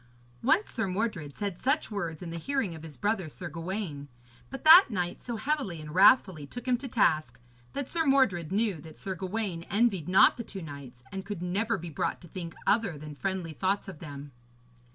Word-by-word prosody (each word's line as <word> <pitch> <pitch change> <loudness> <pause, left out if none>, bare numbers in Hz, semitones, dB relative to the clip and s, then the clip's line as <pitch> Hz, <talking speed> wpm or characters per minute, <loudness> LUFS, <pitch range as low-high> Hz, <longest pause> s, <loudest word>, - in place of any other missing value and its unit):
Once 395 +7 +2
Sir 225 -4 -1
Mordred 185 -7 -3
said 200 -4 -3
such 275 -1 +1
words 170 -6 -4
in 170 - -6
the 170 - -4
hearing 265 - -1
of 160 - -9
his 155 -3 -10
brother 205 -5 -1
Sir 175 +3 -7
Gawaine; 165 -3 -5 0.4
but 270 - -7
that 335 +5 +10
knight 180 -5 -2
so 240 - -4
heavily 260 - -2
and 150 0 -8
wrathfully 190 - +5
took 245 - -8
him 250 - +4
to 265 +2 -7
task, 155 - +1 0.3
that 280 -2 -3
Sir 325 -1 -1
Mordred 205 - +3
knew 200 -5 0
that 160 -2 -12
Sir 190 - -4
Gawaine 190 -1 -3
envied 200 -6 +1
not 185 - +6
the 235 - -4
two 195 -4 -7
knights, 140 -5 -10
and 190 0 -5
could 200 -4 -5
never 205 +5 0
be 170 -2 -7
brought - - -2
to 175 - -12
think 170 -1 -7
other 205 -8 +2
than 150 +1 -8
friendly 185 0 -3
thoughts 195 +6 -1
of 185 -6 -8
them. 145 -2 -8
190 Hz, 200 wpm, -29 LUFS, 160-225 Hz, 0.4 s, that